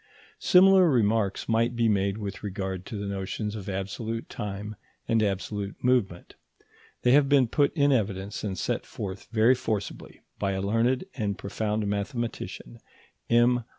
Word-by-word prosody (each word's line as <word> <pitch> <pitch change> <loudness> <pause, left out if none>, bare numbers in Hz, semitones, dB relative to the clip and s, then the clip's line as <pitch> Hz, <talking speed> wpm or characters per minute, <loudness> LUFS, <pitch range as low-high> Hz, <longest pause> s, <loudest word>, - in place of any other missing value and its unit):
Similar 185 -1 +6
remarks 110 -6 +1
might 115 +2 +1
be 115 -1 +2
made 100 -1 +1
with 100 -2 -6
regard 95 -2 -4
to 110 - -5
the 100 - -4
notions 100 +2 -3
of 100 -2 -6
absolute 110 +4 -4
time 105 +1 -5 0.3
and 115 -1 +2
absolute 100 0 -2
movement. 120 -9 +1 0.7
They 125 - +4
have 140 0 +5
been 140 -4 +5
put 140 +5 +2
in 145 -2 +3
evidence 100 -4 -1
and 95 -3 -3
set - - -2
forth 95 -1 -6
very 115 +2 +5
forcibly 110 -5 -4 0.2
by 100 -1 0
a 95 - -2
learned 115 - +1
and 105 -6 -2
profound 105 +1 -2
mathematician, 100 - -4 0.5
M. 120 +1 +4
105 Hz, 150 wpm, -27 LUFS, 100-120 Hz, 0.7 s, Similar